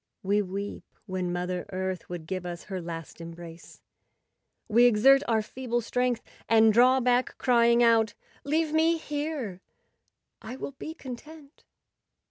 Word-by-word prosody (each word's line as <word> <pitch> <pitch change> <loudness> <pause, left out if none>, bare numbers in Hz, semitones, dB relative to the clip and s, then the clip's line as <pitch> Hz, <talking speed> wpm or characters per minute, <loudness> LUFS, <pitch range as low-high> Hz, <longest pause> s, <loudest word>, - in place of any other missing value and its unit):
We 200 +2 +2
weep 200 +1 -5 0.2
when 185 -3 -3
Mother 180 0 -3
Earth 185 -1 -4
would 175 -3 -6
give 185 +1 -4
us 175 -1 -6
her 190 -3 -5
last 165 0 -8
embrace; 165 0 -11 0.8
we 235 +2 +5
exert 245 +4 +6
our 220 -2 +2
feeble 240 +1 -3
strength 245 +1 -1 0.3
and 220 -1 +5
draw 255 +3 +5
back, 250 0 +1
crying 235 -1 +4
out, 225 -2 +3 0.3
''Leave 310 +2 0
me 325 +1 +3
here; 290 - -4 0.8
I 235 +4 -7
will 270 - -6
be 315 +4 -8
con¬ 260 -6 -7
tent." 300 +2 -16
230 Hz, 140 wpm, -27 LUFS, 185-260 Hz, 0.8 s, exert